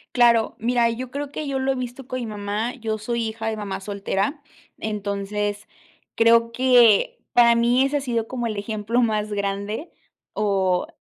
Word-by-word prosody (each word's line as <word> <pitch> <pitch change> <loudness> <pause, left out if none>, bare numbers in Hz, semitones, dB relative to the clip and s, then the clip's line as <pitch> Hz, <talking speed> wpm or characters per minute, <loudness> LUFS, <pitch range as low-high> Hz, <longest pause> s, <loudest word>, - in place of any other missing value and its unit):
Claro, 235 -2 +4
mira, 235 0 +2
yo 245 +2 -5
creo 280 +2 -5
que 305 0 -5
yo 275 -1 -1
lo 265 +1 +1
he - - -1
visto 255 +1 -6
con 255 -1 -3
mi 240 - -4
mamá. 210 +2 -3
Yo 220 -4 -3
soy 230 +1 -2
hija 220 0 -5
de 220 - -1
mamá 205 -2 -4
soltera, 200 +7 -2 0.4
entonces, 205 0 -3 0.5
creo 230 0 +4
que 245 -4 +4 0.2
para 235 -1 +6
mí 240 +2 +3
ese 290 +2 0
ha - - -3
sido 235 -4 -2
como 240 -1 -3
el 215 -2 -3
ejemplo 215 +3 -1
más 215 -2 0
grande 200 - -3 0.4
o 190 -3 +1
230 Hz, 175 wpm, -23 LUFS, 210-245 Hz, 0.5 s, para